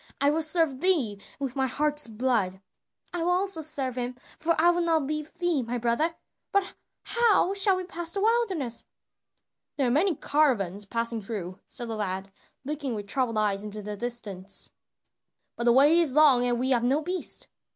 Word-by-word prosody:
I 280 +1 +3
will 320 +2 0
serve 310 -4 +1
thee 265 - +1 0.2
with 275 -2 -4
my 265 -1 +1
heart's 295 +1 +1
blood." 220 -5 0 0.5
"I 350 - -1
also 360 +1 +2
will - - 0
serve 270 -5 0
him, 245 +1 -3 0.2
for 335 +1 +1
I 345 +2 +6
will 350 0 0
not 325 -4 +1
leave 305 +1 -4
thee, 350 -5 0
my 245 +1 -3
brother; 240 +8 0 0.4
but 400 -1 +1 0.3
how 445 -5 +3
shall 395 -1 +4
we 370 - -3
pass 345 -2 -4
the 400 - -1
wilderness?" 390 - 0 0.9
"There 275 - +1
are - - +1
many 330 +6 +2
caravans 215 - +1
passing 230 +2 -2
through," 195 -4 -6
said 240 -2 -5
the 225 - -4
lad, 195 -2 -4 0.3
looking 285 -4 -3
with 205 -1 -5
troubled 235 +1 0
eyes 205 -2 +1
into 210 0 -7
the 210 +1 -5
distance, 205 -4 -5 0.8
"but 235 - -3
the 240 - +6
way 290 +7 +6
is 305 -6 +2
long 285 -5 +6
and 240 -1 +1
we 260 +2 +1
have 240 -2 +3
no 270 +5 +2
beast." 360 +3 -2
270 Hz, 180 wpm, -27 LUFS, 230-330 Hz, 0.9 s, I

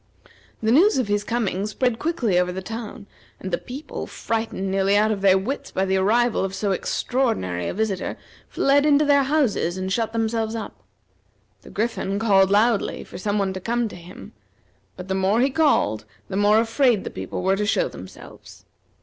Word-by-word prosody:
The 220 - +2
news 350 - +5
of 255 -5 0
his 205 0 +1
coming 210 -4 -1
spread 230 +2 -1
quickly 245 - +1
over 180 0 0
the 190 +1 -6
town, 220 0 -7 0.3
and 190 - -6
the 175 - 0
people, 275 +5 -7
frightened 220 -4 -3
nearly 195 +1 +2
out 215 +1 +3
of 200 -2 -2
their 190 -1 +5
wits 240 +9 -4
by 190 - -1
the 190 0 +1
arrival 230 +5 +2
of 195 0 -3
so 200 0 -1
extraordinary 180 - -1
a - - -3
visitor, 205 -3 -2 0.3
fled 280 +1 +3
into 300 0 +4
their 285 -1 +4
houses, 265 - 0
and 190 0 -2
shut 225 0 -1
themselves 225 0 -1
up. 220 -3 -7 0.8
The - - -14
Griffin 210 -2 -2
called 195 -3 +4
loudly 210 +1 +2
for - - -10
some 205 +2 -1
one 195 -2 0
to 190 - -5
come 235 +3 -1
to - - -10
him, 175 +1 -12 0.6
but 180 0 -8
the 190 - -1
more 190 +3 +1
he 270 +3 +2
called, 265 - +1 0.2
the - - -4
more 205 +2 +4
afraid 230 -1 +2
the - - -6
people - - -5
were 190 +1 +2
to 210 - -1
show - - +2
themselves. - - -13
215 Hz, 190 wpm, -23 LUFS, 190-240 Hz, 0.8 s, news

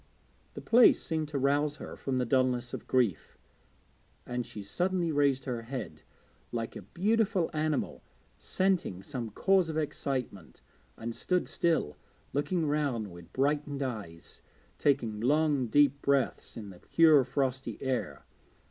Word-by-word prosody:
The - - -6
place 240 +1 +6
seemed 160 -2 -2
to 145 -1 -3
rouse 145 +2 +1
her - - -8
from 135 -2 -2
the 125 - +1
dulness 125 0 +1
of - - -6
grief, 120 -9 0 0.9
and 125 -1 -3
she 105 - -8
suddenly 175 - 0
raised 140 -2 +2
her 125 -3 -3
head, 115 - -6 0.5
like 115 -1 -4
a - - -6
beautiful 195 - +1
animal 155 -2 -1 0.4
scenting 185 - 0
some 125 -3 -5
cause 185 - +2
of 160 - -3
excitement, 130 - -3 0.4
and 115 +1 -5
stood 180 +8 0
still, 165 - 0 0.4
looking 160 +4 0
round 140 -9 -1
with 85 -1 -13
brightened 145 +1 0
eyes, 100 -10 -7 0.4
taking 120 -7 +1
long 145 +1 +2
deep 140 +2 +3
breaths 140 -1 0
in 105 -3 -7
the 90 - -14
pure 155 - +5
frosty 130 0 -2
air. 130 -2 -3
135 Hz, 140 wpm, -30 LUFS, 120-155 Hz, 0.9 s, place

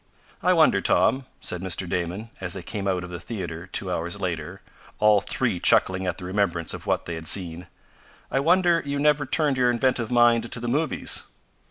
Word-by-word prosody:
"I - - +3
wonder, - - +4
Tom," 130 0 +2
said 90 - -3
Mr. 95 0 -2
Damon, 90 +6 -3
as 90 -2 -3
they 95 - -6
came 100 0 -4
out 90 -2 0
of 90 - -8
the 85 - -6
theater 85 -4 -6
two 95 0 -1
hours 85 +3 -3
later, 90 0 -4 0.3
all 105 -1 +4
three 125 -7 -2
chuckling 95 +2 +2
at 90 - -2
the 90 - -7
remembrance 90 -4 0
of - - -8
what - - 0
they 85 - -5
had 80 0 -3
seen, 90 -2 +2 0.6
"I 135 - +1
wonder 170 +2 +3
you 140 0 -3
never 145 -1 +2
turned 145 -1 +1
your 125 -1 +3
inventive 120 -1 0
mind 120 -1 +3
to - - 0
the 120 - -5
movies." 150 +6 0
100 Hz, 195 wpm, -24 LUFS, 90-125 Hz, 0.6 s, wonder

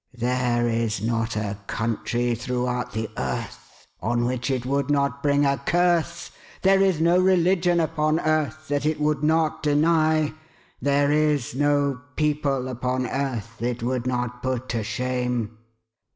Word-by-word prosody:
There 120 0 +1
is 115 -2 0
not 115 +1 -1
a 105 -1 -3
country 120 +2 -1
throughout 125 +1 -2
the 110 0 -2
earth 65 0 -5 0.2
on 120 +1 0
which 125 +1 -2
it 130 -2 -1
would 140 +1 0
not 140 -1 +1
bring 145 0 +3
a 140 0 +1
curse. 170 0 +1 0.3
There 195 0 +5
is 190 -5 +3
no 170 +2 +4
religion 180 -1 +3
upon 155 -1 +1
earth 155 0 -1
that 145 0 0
it 155 0 0
would 150 -1 +1
not 155 +1 +1
deny; 155 0 +2 0.5
there 140 +2 +2
is 150 -5 +1
no 145 -1 +1
people 145 -4 0
upon 125 0 -2
earth 120 -5 -3
it 120 0 -2
would 125 0 -1
not 125 -1 -2
put 130 -1 -3
to 115 -1 -1
shame." 120 0 -2
135 Hz, 145 wpm, -24 LUFS, 120-155 Hz, 0.5 s, There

